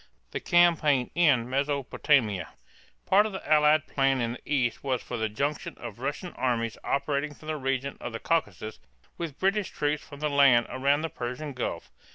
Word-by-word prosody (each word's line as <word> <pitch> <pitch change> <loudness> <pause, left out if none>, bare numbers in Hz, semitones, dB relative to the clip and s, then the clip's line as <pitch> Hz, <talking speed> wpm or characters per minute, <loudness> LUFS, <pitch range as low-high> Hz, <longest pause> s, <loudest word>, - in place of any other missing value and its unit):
THE - - -3
CAMPAIGN 160 -7 +3
IN 140 -9 +3
MESOPOTAMIA. 135 - +1 0.6
Part 205 +3 +4
of 215 - -8
the 190 - -7
Allied 155 0 +4
plan 135 -2 +1
in 115 -1 -1
the 130 - -11
east 120 -5 0
was 130 -3 -1
for 125 - -5
the 110 -1 -1
junction 140 +8 -3
of 120 -2 -8
Russian 145 +7 -4
armies 115 -3 -1
operating 140 +1 -1
from 155 - -11
the 155 - -1
region 135 0 -2
of 120 - -5
the 115 - -5
Caucasus 110 - -2 0.4
with 165 -5 -5
British 195 +1 +1
troops 150 0 -1
from 145 -2 -12
the 150 - 0
land 140 -5 +5
around 140 +3 +2
the 165 - -2
Persian 125 +4 -5
Gulf. 125 - -4
140 Hz, 180 wpm, -27 LUFS, 125-150 Hz, 0.6 s, land